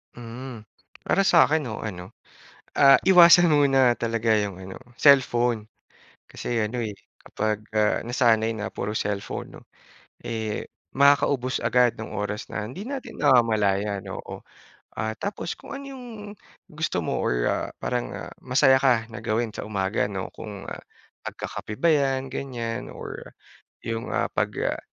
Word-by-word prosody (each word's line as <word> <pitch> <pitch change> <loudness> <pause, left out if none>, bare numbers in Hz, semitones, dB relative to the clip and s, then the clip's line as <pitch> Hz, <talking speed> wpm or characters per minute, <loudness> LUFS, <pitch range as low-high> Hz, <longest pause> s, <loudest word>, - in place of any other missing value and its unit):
Mm, 120 0 -8 0.4
para 195 - +1
sa 170 -2 +6
akin 155 -2 +1
no 110 -3 -5
ano, 90 -4 -7 0.6
ah, 135 -1 +7
iwasan 175 -2 +7
muna 135 -4 +4
talaga 115 -1 0
yung 100 -3 -3
ano, 95 0 -9 0.2
cellphone. 120 -5 +3 0.6
Kasi 115 -2 -3
ano 115 +4 -3
eh, 110 -3 -3 0.2
kapag 110 0 -2 0.2
ah, 105 0 +2
nasanay 115 -2 +2
na 105 0 -5
puro 105 - -4
cellphone 100 -2 -4
'no, - - -22 0.6
eh, 110 -2 -4 0.2
makakaubos 140 -3 +3
agad 120 0 +3
nung 110 - -8
oras 105 +1 -4
na 105 -1 -4
hindi 140 - -7
natin 270 +1 -6
namamalayan, 105 -7 +2
oo, - - -8 0.5
ah, 110 0 -2
tapos 200 +1 -3
kung - - -9
ano 280 - -8
yung 260 -2 -9 0.6
gusto 155 - -3
mo - - -1
or - - 0
ah, - - 0
parang 125 -1 -3 0.2
masaya 130 +1 +4
ka 125 -4 +3
na - - -7
gawin 110 0 -1
sa 105 - -7
umaga, 100 0 -1
'no 95 -2 -5
kung 100 -2 -9 0.6
pagkakape 105 - -6
ba 170 - +5
yan 135 -2 0
ganyan 120 -4 -4
or, - - -8 0.6
yung 115 0 -4
ah, - - 0
pag, - - -1 0.2
ah, - - -7
115 Hz, 145 wpm, -25 LUFS, 105-135 Hz, 0.6 s, ah